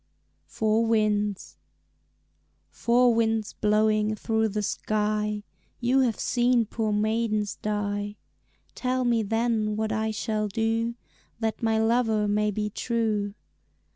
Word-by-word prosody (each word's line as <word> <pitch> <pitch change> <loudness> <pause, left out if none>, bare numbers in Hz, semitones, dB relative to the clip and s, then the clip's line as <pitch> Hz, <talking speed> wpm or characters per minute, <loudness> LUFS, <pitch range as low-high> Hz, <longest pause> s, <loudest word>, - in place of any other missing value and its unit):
Four 220 +1 +1
Winds 210 -3 0 1.1
"Four 240 +1 +3
winds 225 -2 0
blowing 215 0 +2
through 220 0 0
the 210 0 -2
sky, 210 0 -1 0.4
You 250 +2 +2
have 245 -4 +1
seen 245 -1 +2
poor 220 0 -2
maidens 215 -1 0
die, 205 -1 -2 0.6
Tell 255 0 -1
me 235 -2 +2
then 220 0 0
what 220 0 -1
I 220 +1 0
shall 215 -1 -1
do 225 +3 -1 0.4
That 220 -1 -2
my 225 -1 +2
lover 225 -1 +2
may 210 +1 +1
be 210 0 -2
true." 215 -3 -1
220 Hz, 115 wpm, -26 LUFS, 210-230 Hz, 1.1 s, Four